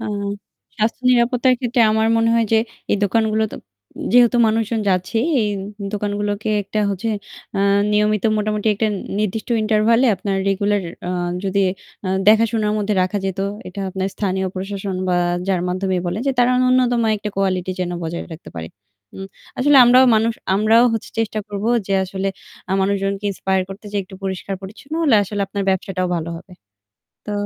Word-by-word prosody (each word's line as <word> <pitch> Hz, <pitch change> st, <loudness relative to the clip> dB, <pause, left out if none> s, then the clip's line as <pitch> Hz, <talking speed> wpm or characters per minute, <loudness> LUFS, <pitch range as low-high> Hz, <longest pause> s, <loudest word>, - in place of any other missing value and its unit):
আ 225 Hz, -, -5 dB, 0.7 s
স্বাস্থ্য 220 Hz, +4 st, -1 dB
নিরাপত্তার 250 Hz, +1 st, +3 dB
ক্ষেত্রে 245 Hz, -1 st, 0 dB
আমার 220 Hz, 0 st, +2 dB
মনে 230 Hz, 0 st, +2 dB
হয় 230 Hz, 0 st, +3 dB
যে 220 Hz, -, +6 dB, 0.3 s
এই -, -, +3 dB
দোকানগুলো 220 Hz, +1 st, +1 dB
তো -, -, -6 dB, 0.6 s
যেহেতু 245 Hz, 0 st, +5 dB
মানুষজন 225 Hz, 0 st, 0 dB
যাচ্ছে 185 Hz, +3 st, 0 dB, 0.2 s
এই 215 Hz, -, +1 dB, 0.4 s
দোকানগুলোকে 205 Hz, 0 st, -2 dB
একটা 205 Hz, +2 st, -4 dB
হচ্ছে 200 Hz, +3 st, -3 dB, 0.5 s
আ -, -, +1 dB, 0.3 s
নিয়মিত 210 Hz, -1 st, +2 dB
মোটামুটি 210 Hz, 0 st, 0 dB
একটা 220 Hz, +2 st, 0 dB, 0.3 s
নির্দিষ্ট 215 Hz, +1 st, -2 dB
ইন্টারভ্যালে 220 Hz, +3 st, +3 dB
আপনার 195 Hz, +1 st, -2 dB
রেগুলার 200 Hz, +1 st, +1 dB, 0.3 s
আ -, -, -1 dB, 0.3 s
যদি 195 Hz, +1 st, +1 dB, 0.7 s
দেখাশোনার 220 Hz, -1 st, +3 dB
মধ্যে 210 Hz, 0 st, 0 dB
রাখা 185 Hz, +3 st, -1 dB
যেত, 190 Hz, 0 st, -3 dB, 0.3 s
এটা 185 Hz, +2 st, -7 dB
আপনার 190 Hz, +1 st, -2 dB
স্থানীয় 190 Hz, -2 st, -1 dB
প্রশাসন 195 Hz, 0 st, -4 dB
বা 180 Hz, -, +2 dB, 0.3 s
যার 185 Hz, -2 st, +1 dB
মাধ্যমেই 185 Hz, 0 st, -1 dB
বলেন 175 Hz, +5 st, -2 dB
যে -, -, +2 dB
তারা 245 Hz, 0 st, +4 dB
নুন্যতম 255 Hz, -1 st, +3 dB, 0.2 s
একটা 210 Hz, 0 st, -5 dB
কোয়ালিটি 185 Hz, -2 st, 0 dB
যেন 180 Hz, -1 st, -1 dB
বজায় 170 Hz, +1 st, -4 dB
রাখতে 160 Hz, -, -10 dB
পারে। 80 Hz, 0 st, -5 dB, 0.5 s
উ -, -, -9 dB, 0.4 s
আসলে 285 Hz, +2 st, +4 dB
আমরাও 250 Hz, +2 st, +6 dB
মানুষ, 225 Hz, +1 st, +2 dB, 0.2 s
আমরাও 215 Hz, +3 st, +4 dB, 0.4 s
চেষ্টা 220 Hz, -1 st, -1 dB
করব 205 Hz, 0 st, -5 dB, 0.2 s
যে 195 Hz, -, 0 dB
আসলে 190 Hz, +1 st, -3 dB, 0.4 s
আ -, -, +1 dB
মানুষজনকে 195 Hz, +1 st, -1 dB
ইন্সপায়ার 190 Hz, -1 st, 0 dB
করতে 195 Hz, +2 st, -10 dB
যেয়ে 200 Hz, -1 st, 0 dB
একটু 190 Hz, -, -13 dB
পরিষ্কার 190 Hz, +1 st, -3 dB
পরিচ্ছন্ন 220 Hz, +10 st, -9 dB
হলে 285 Hz, -7 st, +4 dB
আসলে 205 Hz, +1 st, -4 dB
আপনার 200 Hz, +1 st, -3 dB
ব্যবসাটাও 185 Hz, -1 st, -1 dB
ভালো 165 Hz, 0 st, -4 dB
হবে। 185 Hz, +2 st, -13 dB, 0.7 s
তো 210 Hz, -, -5 dB
205 Hz, 160 wpm, -20 LUFS, 190-225 Hz, 0.7 s, যে